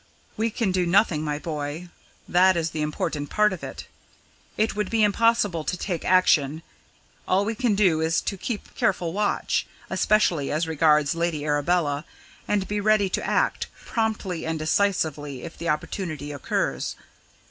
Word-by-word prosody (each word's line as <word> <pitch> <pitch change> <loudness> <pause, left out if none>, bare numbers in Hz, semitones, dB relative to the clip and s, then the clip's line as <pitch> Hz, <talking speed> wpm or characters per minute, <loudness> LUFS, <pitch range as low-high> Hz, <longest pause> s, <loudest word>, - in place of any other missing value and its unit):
"We 225 +2 0
can 220 -3 -1
do 180 -1 +1
nothing, 180 -4 +3
my 150 -1 -2
boy 150 +2 -5 0.4
that 185 0 +4
is 165 -1 -1
the 155 - -3
important 150 -1 -2
part 210 -2 +3
of 185 - -8
it. - - -7 0.7
It 215 0 +1
would 210 -2 -1
be 225 -1 +2
impossible 205 -5 +2
to 180 - -2
take 175 -3 -3
action 160 -4 +3 0.6
all 195 +2 +2
we 225 - -1
can 230 -2 +1
do 185 -6 +3
is 160 0 +2
to 200 - -3
keep 210 +3 -5
careful 175 -3 0
watch, 205 +1 0 0.2
especially 175 -9 +2
as 155 +3 0
regards 150 -2 +3
Lady 165 -3 -1
Arabella, 150 0 +1 0.4
and 205 -2 0
be 205 0 -1
ready 215 -2 +3
to - - -2
act, - - 0 0.2
promptly 215 -6 -2
and 160 0 -2
decisively, 155 -5 0
if 170 - -8
the 170 - -4
opportunity 150 -1 -3
occurs." 145 -2 -2
175 Hz, 160 wpm, -25 LUFS, 155-205 Hz, 0.7 s, that